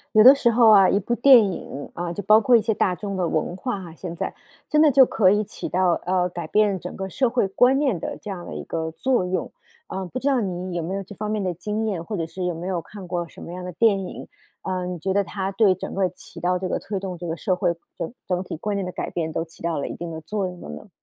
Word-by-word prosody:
有 215 - +8
的 265 - +11
时 265 -4 +2
候 230 -1 +6
啊， 195 -3 +7
一 200 - +3
部 225 +4 -1
电 240 -6 +6
影， 140 -4 -7
呃， 175 0 -4
就 205 - -4
包 215 +2 +6
括 240 +3 +5
一 225 - +3
些 225 - +1
大 190 -3 +1
众 200 +2 -5
的 180 -2 0
文 160 +2 -1
化 245 +1 -3
哈 170 -3 -10
现 170 0 -7
在， - - -3 0.3
真 305 - +3
的 310 -1 +7
就 265 0 +7
可 200 -6 +3
以 210 +2 +2
起 - - -6
到， 185 -1 +2
呃， 180 0 +1
改 175 0 -5
变 205 -3 +2
整 180 - -7
个 190 0 -5
社 255 +6 +1
会 235 -3 +1
观 250 +7 +3
念 265 - +1
的 - - -4
这 210 - -8
样 180 -3 -6
的 - - -7
一 - - -6
个 160 -1 -3
作 245 +3 0
用。 180 0 -2 0.4
呃， 190 0 -4
不 240 - -5
知 265 - -5
道 270 -3 +3
你 185 -3 -3
有 170 - -1
没 175 +4 -3
有 195 - -2
这 200 +2 -11
方 210 +1 -4
面 215 -2 -1
的 185 - 0
经 210 +5 -3
验， 190 -6 -2
或 210 - -4
者 165 - -1
是 180 +3 -6
有 180 -1 -1
没 170 +2 -6
有 185 -2 -1
看 190 +3 -11
过 175 -1 -3
什 - - -13
么 170 - -8
样 180 0 -6
的 180 - -5
电 195 0 +2
影？ - - -8 0.4
呃， 185 -1 -2
你 180 -1 -4
觉 190 +4 -1
得 200 +1 +3
它 195 +1 -3
对 200 -3 +4
整 185 - -7
个 190 -1 +2
起 180 - -12
到 180 +1 +1
这 185 0 -3
个 - - -1
推 200 -1 -4
动 185 -2 -5
这 175 - -6
个 165 0 -3
社 185 0 0
会 175 -2 0 0.2
整 165 - -4
整 180 0 -1
体 185 - -6
观 205 +5 -2
念 195 -2 -2
的 180 - -5
改 - - -4
变， 160 -2 -2
都 165 - -2
起 165 0 -16
到 165 -2 -1
了 - - -3
一 - - -6
定 170 0 -6
的 160 0 -6
作 205 +2 -2
用 180 -1 -7
的 - - -9
呢？ 75 - -9
190 Hz, 320 characters per minute, -23 LUFS, 175-210 Hz, 0.4 s, 的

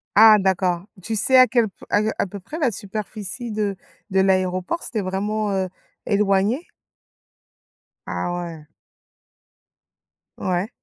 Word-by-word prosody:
Ah, 220 0 +9
d'accord. 185 -1 +1 0.2
Tu 225 - -2
sais 260 +5 +4
à 255 0 +8
quel 235 -2 +2
p - - -17
à 205 - +3
heu 215 +1 0
à - - +1
peu 200 +1 -8
près, 300 - -8
la 265 -7 +2
superficie 210 +3 -5
de 210 -2 -1 0.3
de 190 -1 +2
l'aéroport? 185 - +1
C'était 220 -4 -2
vraiment, 205 +3 -1
heu, 190 -1 0 0.4
éloigné? 205 - +2 1.4
Ah, 175 - -2
ouais. 165 -3 -8 1.7
Ouais. 185 +3 -1
200 Hz, 135 wpm, -22 LUFS, 190-220 Hz, 1.7 s, Ah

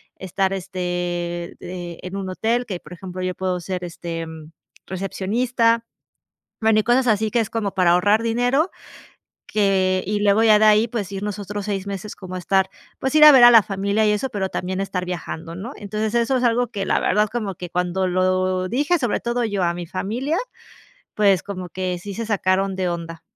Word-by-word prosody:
estar 190 +1 -1
este, 175 -2 -3
de 175 -1 -7
en 185 +2 -6
un 190 -1 -4
hotel, 230 +6 0
que, 185 -4 -5
por - - -12
ejemplo, 185 +1 -7
yo 185 0 -2
puedo 185 -1 -2
ser 180 +1 -4
este, 170 -1 -5
mm, 160 -1 -11 0.4
recepcionista. 230 +5 0 0.8
Bueno, 220 -1 +4
y - - -12
cosas 245 +2 +2
así 215 0 +2
que 240 - +2
es 225 -1 -1
como 215 -4 -2
para 180 -2 +3
ahorrar 205 +5 +3
dinero, 245 +8 +1 0.8
que 190 -3 +1
y 205 +1 0
luego 205 +2 +4
ya 215 -2 +6
de 215 - +4
ahí, 215 +2 +5
pues 205 -4 -4
ir 195 - -5
nosotros 205 0 -4
6 200 -2 -3
meses 200 +1 -6
como 185 -1 -7
estar 190 +1 +1 0.3
pues, 265 +1 -2
ir 305 - +5
a 300 - +12
ver 255 -3 +8
a 240 - +10
la 225 -2 +8
familia 200 +3 0
y - - +4
eso, 210 +6 -1
pero 190 -2 -2
también 185 +1 -3
estar 185 -2 -2
viajando, 170 -1 -6
¿no? 205 +8 -6
Entonces, 210 +2 -3
eso 235 +3 +2
es - - -2
algo 240 +1 +2
que 200 -4 -4
la - - +2
verdad, 210 +2 +2
como 215 -5 -3
que 175 0 -8
cuando 180 +1 0
lo 185 0 +1
dije, 290 - +1
sobre 245 -6 -1
todo 240 0 -1
yo 205 -4 -1
a 170 - +2
mi 175 -1 -6
familia, 240 - -2 0.8
pues, 200 -4 +3
como 185 -3 -6
que 185 -1 -3
sí 200 +2 -7
se 230 +2 -4
sacaron 195 -2 +1
de 185 -1 -1
onda. 165 -1 -6
195 Hz, 200 wpm, -22 LUFS, 185-220 Hz, 0.8 s, a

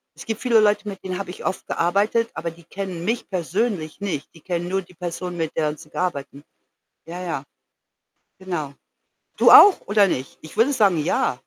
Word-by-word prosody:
Es - - -11
gibt 225 -1 -3
viele 235 -3 +4
Leute, 210 0 +2
mit 195 -1 -9
denen 185 -1 -4
habe 195 -2 -5
ich - - -10
oft 190 - -3
gearbeitet, 205 +6 +1
aber 170 +1 -4
die 170 +1 -17
kennen 185 -2 -6
mich 230 +2 -1
persönlich 185 -2 -2
nicht. 180 -8 -3
Die 165 - -16
kennen 175 0 -3
nur 195 +1 0
die 180 - -19
Person, 180 +1 -5
mit 160 -1 -3
der 155 -1 +2
'n 150 - -6
sie 150 - -14
arbeiten. 145 -5 -4 0.6
Ja, 175 +2 -7
ja. 155 -6 -3 1.0
Genau. 175 -7 -4 0.6
Du - - +6
auch, 405 - +9
oder 205 -1 +4
nicht? 130 -7 -4
Ich 160 - -12
würde 245 +6 +4
sagen, 200 -8 +3
ja. - - 0
180 Hz, 195 wpm, -22 LUFS, 165-205 Hz, 1.0 s, auch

